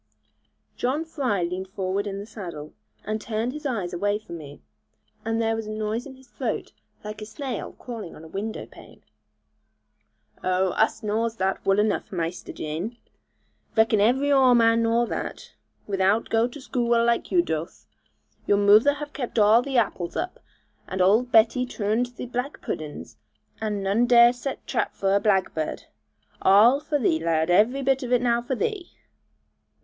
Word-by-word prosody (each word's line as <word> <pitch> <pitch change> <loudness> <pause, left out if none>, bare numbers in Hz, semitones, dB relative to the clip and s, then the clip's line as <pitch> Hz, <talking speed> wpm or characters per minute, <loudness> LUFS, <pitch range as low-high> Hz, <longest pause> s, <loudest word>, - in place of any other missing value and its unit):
John 280 +6 -1
Fry 255 - -1
leaned 180 +2 -3
forward 190 +1 -2
in 195 -1 -4
the 200 - -6
saddle, 175 -9 -8 0.3
and 215 0 -2
turned 225 +3 -2
his 300 0 -4
eyes 200 -9 -3
away 205 +4 0
from 170 -6 -9
me; 145 -1 -11 0.6
and 225 0 -1
then - - 0
there 225 0 +1
was 225 -1 -5
a - - -5
noise 215 +4 -3
in 265 - -11
his 260 0 -19
throat - - -4 0.3
like 215 0 -7
a - - -5
snail 250 0 -5
crawling 230 -8 -8
on 155 - -12
a - - -10
window 200 +6 -5
pane. - - -16 1.4
'Oh, 185 +1 +1
us 220 +4 0
knaws 220 +2 -1
that 190 -2 -1
wull 195 0 +2
enough, 210 0 0
Maister 170 -1 -4
Jan; 165 +10 -5 0.8
reckon 220 -1 +4
every 265 +7 +3
Oare 260 -3 +6
man 230 0 +4
knaw 230 +1 +2
that, - - -6 0.3
without 195 +2 +1
go 225 +1 +3
to 245 - -10
skoo 240 -3 0
ull, 230 0 +3
like 235 0 0
you 350 -2 +4
doth. 160 - -5 0.6
Your 205 - +4
moother 210 +8 +5
have 295 0 -7
kept 250 -4 -5
arl 215 +2 +6
the 270 0 -2
apples 190 -6 0
up, 365 - -3 0.5
and 190 - -4
old 215 +7 +3
Betty 225 +3 +5
toorned 230 0 -1
the - - -6
black 250 +3 -4
puddens, 150 -1 -6 0.4
and 210 -2 -2
none 210 +5 +2
dare 240 0 +7
set 260 +2 -6
trap 225 -5 -2
for 195 0 +1
a - - +4
blagbird. 190 -7 0 0.6
Arl 220 +8 +6
for 300 0 -1
thee, 185 - +1
lad; 160 0 +1
every 235 +9 +3
bit 270 +1 +2
of 250 -2 -5
it 245 -1 +3
now 235 -1 +2
for 250 +2 -3
thee!' 395 - -3
220 Hz, 175 wpm, -25 LUFS, 195-245 Hz, 1.4 s, dare